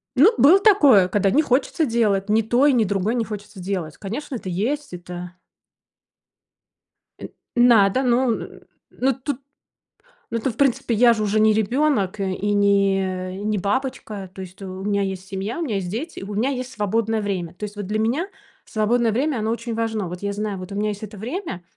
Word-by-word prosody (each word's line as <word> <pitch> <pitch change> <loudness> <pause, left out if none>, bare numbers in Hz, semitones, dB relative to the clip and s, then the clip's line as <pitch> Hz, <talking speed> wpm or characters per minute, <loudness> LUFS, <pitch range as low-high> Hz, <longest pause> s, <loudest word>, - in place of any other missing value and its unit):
Ну, 335 - +6
было 335 +8 +7
такое, 290 - +6
когда 195 +1 +1
не 300 - +4
хочется 275 +3 +1
делать. 210 -5 +1
Ни 220 +1 +4
то 240 +5 +2
и 285 - +5
ни 235 - +3
другое 200 +2 0
не 230 - 0
хочется 210 -2 -8
делать. 180 -4 -4
Конечно, 255 +8 -5
это 205 -5 -5
есть, 240 +9 -2
это 180 0 -8 1.9
Э, - - -6 0.3
надо, 240 0 +5
ну. 245 -1 +2 0.5
Но 265 +2 0
тут, 270 +1 -5 0.9
но 230 - -1
тут, 230 +1 -2
в - - -25
принципе, 250 -4 +1
я 235 +2 +6
же 215 -2 -2
уже 210 +1 +1
не 215 0 +5
ребенок, 220 -2 +1
э, 190 -1 -1
и 205 +2 -1
не 195 -2 +1
не 215 0 0
бабочка. 205 -2 -3
То 190 - -8
есть 185 +1 -11
у 190 0 -7
меня 200 0 0
есть 190 -1 -5
семья, 195 - -4
у - - -1
меня 240 -10 -2
есть 190 -3 -2
дети, 270 - -5
и - - -8
у 205 - -6
меня 235 +6 +1
есть 255 -1 -4
свободное 225 0 0
время. 185 -5 -3
То 195 - -12
есть 210 0 -5
вот 205 -2 -5
для 215 +1 -1
меня 250 - 0 0.4
свободное 225 +2 +1
время, 265 +4 0
оно 220 +1 -1
очень 230 0 -4
важно. 220 -3 -2
Вот 180 +1 -7
я 200 0 -2
знаю, 205 -1 -3
вот 185 +1 -8
у - - -5
меня 210 +1 0
есть 205 0 -6
это 210 0 -8
время, 225 - -5
215 Hz, 200 wpm, -22 LUFS, 195-245 Hz, 1.9 s, было